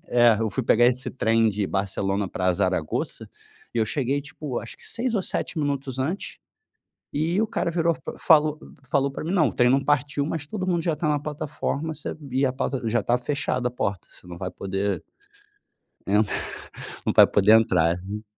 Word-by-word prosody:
É, 120 -2 +5
eu 110 -1 0
fui 130 +7 -2
pegar 120 +1 +4
esse 125 +1 +1
trem 115 -2 +2
de 105 -1 -1
Barcelona 95 0 -1
pra 90 0 0
Zaragoza 85 - -2 0.5
e - - 0
eu 110 - +3
cheguei 140 +2 0
tipo 140 -2 -5
acho 115 - -8
que - - -16
6 235 0 -2
ou 195 - +1
7 170 - +1
minutos 140 -3 -2
antes 160 +10 -3 0.8
e 165 +7 +1
o 220 - +1
cara 170 - -1
virou, 165 -1 +1
fa - - -8
falou 155 -2 +4 0.3
falou 140 -1 +2
pra 135 - -6
mim: 165 - -3
"Não, 165 -8 +4
o - - -8
trem 125 0 +4
não 135 +1 +3
partiu, 145 0 +1
mas 155 -1 -3
todo 185 -1 -4
mundo 170 -2 +1
já 165 -3 0
tá 155 +1 -2
na 145 -1 +1
plataforma, 150 +1 -3
sabia 140 -3 -2
plata 135 0 -2
já 120 +2 +2
está 120 +4 +2
fechada 125 -1 -1
a - - -15
porta, 100 -6 -3
você - - -17
não 85 -1 -8
vai 95 0 -4
poder 100 +1 -2 1.1
entrar 105 +2 +2 0.7
não - - +1
vai - - +9
poder 105 +1 +5
entrar, 85 -6 +2
né. 105 +3 -6
130 Hz, 195 wpm, -25 LUFS, 110-150 Hz, 1.1 s, vai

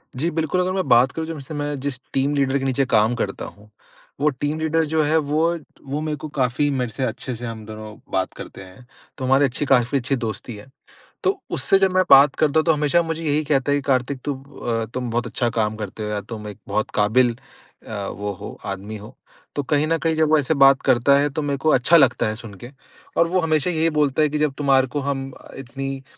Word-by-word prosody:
जी, 150 +7 0
बिल्कुल, 160 +2 0
अगर 180 +1 0
मैं 185 -3 -1
बात 125 +2 +5
करूँ, 160 0 -4
जब 165 -2 -5
से 140 +3 -9
मैं 145 -1 -3
जिस 135 -1 -3
टीम 140 +2 +1
लीडर 140 -1 +1
के 135 - -3
नीचे 135 +1 +1
काम 110 0 +2
करता 100 -5 -3
हूँ, 105 +1 -13 0.5
वो 150 +2 +3
टीम 145 +3 -3
लीडर 160 +1 +1
जो 155 +1 +1
है, 155 +2 +2
वो 160 +3 +1 0.3
वो 145 +3 -2
मेरे 155 -1 -2
को 155 - -7
काफ़ी 130 +3 +1
मेरे 125 -3 -1
से 135 - -3
अच्छे 125 +1 -4
से 120 +2 -7
हम 115 -2 -7
दोनों 110 0 -9 0.2
बात 95 0 0
करते - - -9
हैं। 95 +7 -15 0.3
तो 130 - -4
हमारी 135 +2 +4
अच्छी, 135 +2 -2
काफ़ी 130 0 +3
अच्छी 135 +1 0
दोस्ती 115 -1 -5
है। 105 +3 -12 0.6
तो 385 0 +1
उससे 195 - +3
जब 190 -1 +3
मैं 185 - +5
बात 135 +1 +7
करता 155 0 +2
हूँ, 155 - 0
तो 165 - +5
हमेशा 150 +3 +2
मुझे 165 0 -4
यही 150 0 +1
कहता 145 -2 +1
है 145 - +3
कि, - - -2
"कार्तिक 130 0 +1
तुम 135 -2 -3
अ, 120 -5 -3
तुम 125 -1 -3
बहुत 120 +1 -1
अच्छा 120 - -1
काम 110 0 0
करते 110 0 -6
हो 105 - -3
या 105 -1 -2
तुम 105 +1 -8
एक 105 - -8
बहुत 105 +2 -1
काबिल 115 +3 +3 0.5
अ, 100 -3 -4
वो 105 +1 -4
हो, 90 - -9
आदमी 100 +2 -5
हो।" 105 +5 -12 0.4
तो 145 - 0
कहीं 145 +2 +1
न 165 +1 +1
कहीं 165 -1 0
जब 155 -1 +2
वो 155 - +5
ऐसे 145 +1 +1
बात 135 -2 +5
करता 130 +1 +4
है, 145 +1 +2
तो 150 +2 -3
मेरे 140 -1 -1
को 155 +3 0
अच्छा 135 +7 +5
लगता 135 -7 +3
है 110 - -2
सुन 110 -2 -10
के 120 - -8 0.5
और 170 - +4
वो 185 +2 +1
हमेशा 160 0 +1
यही 165 -1 +1
बोलता 150 -2 +1
है 150 - +3
कि, 150 - -2
"जब 150 -2 +1
तुम्हारे 135 -2 +3
को 145 +4 -3
हम 135 -1 -3 0.3
इतनी 135 +1 -6
135 Hz, 245 wpm, -22 LUFS, 120-150 Hz, 0.6 s, बात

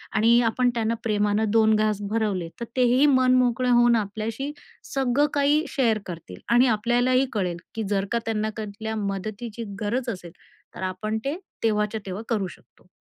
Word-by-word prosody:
आणि 230 +3 +5
आपण 250 +2 +1
त्यांना 230 0 0
प्रेमानं 210 0 +1
2 220 0 +4
घास 215 -1 +1
भरवले, 200 -7 -1
तर 235 - -3
तेही 255 +3 +4
मन 255 -2 +4
मोकळे 250 0 +2
होऊन 240 -1 +5
आपल्याशी 220 +6 -3 0.4
सगळं 270 +2 +2
काही 290 +2 +3
शेअर 230 -5 +1
करतील 160 - -8
आणि 245 +2 +6
आपल्यालाही 245 +4 +2
कळेल 180 -5 -1 0.2
की, 220 - -2
जर 200 -1 +1
का 235 - +2
त्यांना 215 -1 -1
कुठल्या 220 +1 -5
मदतीची 215 +3 -4 0.2
गरज 240 +4 -1
असेल, 180 -5 -6 0.4
तर - - -8
आपण 190 +4 -2
ते 290 +5 -1 0.3
तेव्हाच्या 215 0 0
तेव्हा 190 +4 -5
करू 205 -5 0
शकतो. 180 - -17
220 Hz, 160 wpm, -25 LUFS, 210-245 Hz, 0.4 s, आणि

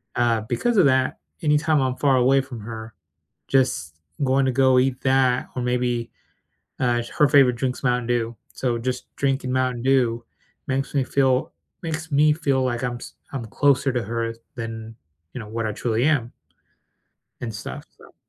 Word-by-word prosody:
uh, 115 -2 +2
because 240 - 0
of 185 - +6
that, 130 -1 +2 0.2
any 150 -1 +3
time 155 -1 +2
I'm 130 -1 0
far 140 -2 +3
away 130 +2 +4
from 130 -3 -9
her, 110 0 -8 0.5
just 80 - +1 0.3
going 135 0 +3
to 130 - +2
go 130 0 +4
eat 130 0 +1
that, 130 -2 +2
or 125 - -2
maybe, 125 -1 -1 0.7
uh, 120 -2 +2
sh 115 - -8
her 150 - +6
favorite 135 -4 +5
drink's 125 +2 -3
Mountain 125 -2 +1
Dew, 120 -1 0 0.2
so 125 -3 -1
just 125 +1 -4
drinking 135 -2 0
Mountain 130 -2 0
Dew 125 -3 +2 0.4
makes 135 0 -2
me 135 - +3
feel 130 -1 +1 0.3
makes 160 -1 -4
me 150 +2 +5
feel 140 -4 0
like 120 -1 -1
I'm 120 -1 -2
s - - -10 0.2
I'm 130 -4 -4
closer 135 +3 +2
to 120 -2 -1
her 115 +2 -2
s 115 - -13 0.2
than, 115 -1 -6 0.4
you - - -5
know, 110 - -8
what 115 +1 -3
I - - -1
truly 115 +2 -1
am 140 -6 +1 1.1
and 115 -2 -4
stuff, 105 - -7
so - - -18
125 Hz, 180 wpm, -23 LUFS, 120-135 Hz, 1.1 s, of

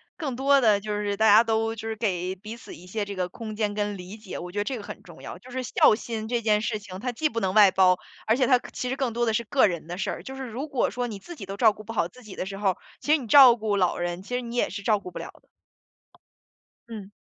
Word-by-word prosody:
更 275 -7 -4
多 275 0 +4
的， 210 -3 +4
就 210 +1 -4
是 205 -1 -2
大 220 0 +4
家 215 +2 +8
都 225 0 0
就 225 0 -6
是 220 - -3
给 185 -4 -1
彼 215 +5 -9
此 235 - -12
一 180 +2 -13
些 210 +2 -3
这 200 0 -6
个 180 -2 -2
空 215 +2 -8
间 210 -2 0
跟 205 -1 -2
理 180 +3 -9
解， 215 -3 -8
我 180 +1 -8
觉 - - -7
得 205 - +1
这 260 +2 -3
个 205 - -8
很 - - -9
重 - - -14
要。 - - -8
就 255 - -15
是 260 +1 -3
孝 215 - +4
心 220 -1 -5
这 240 -1 0
件 210 -1 +2
事 220 -1 -2
情， 185 -2 -9
它 250 0 -2
既 310 +6 0
不 230 -5 -3
能 190 -1 0
外 205 -3 +7
包， 185 -1 +4 0.3
而 225 +3 +2
且 255 -3 +2
它 255 - +6
可 - - -11
其 250 - -4
实 265 - -1
更 265 -4 -1
多 240 +1 0
的 225 - +1
是 235 - 0
个 260 -1 +3
人 170 -4 -4
的 175 +2 -6
事 195 - -2
儿。 - - -7
就 265 0 -8
是 265 - -5
如 265 +7 -5
果 265 - 0
说 245 -1 -2
你 205 -3 -7
自 345 - -10
己 195 - -8
都 195 +1 -7
照 220 -2 +5
顾 215 - -12
不 225 - -8
好 190 -6 0
自 250 +7 -17
己 210 -3 -10
的 - - -3
时 195 0 -6
候， 195 -3 0 0.2
其 295 - 0
实 315 - +6
你 250 -5 -8
照 250 -1 +8
顾 210 -2 -1
老 180 -3 +1
人， 175 +1 -3
其 245 - -8
实 250 - 0
你 235 0 -7
也 - - +1
是 200 - -6
照 210 +1 +2
顾 180 - -9
不 - - -7
了 - - -6
的。 - - -22 1.5
嗯。 210 -3 -9
215 Hz, 330 characters per minute, -26 LUFS, 200-240 Hz, 1.5 s, 家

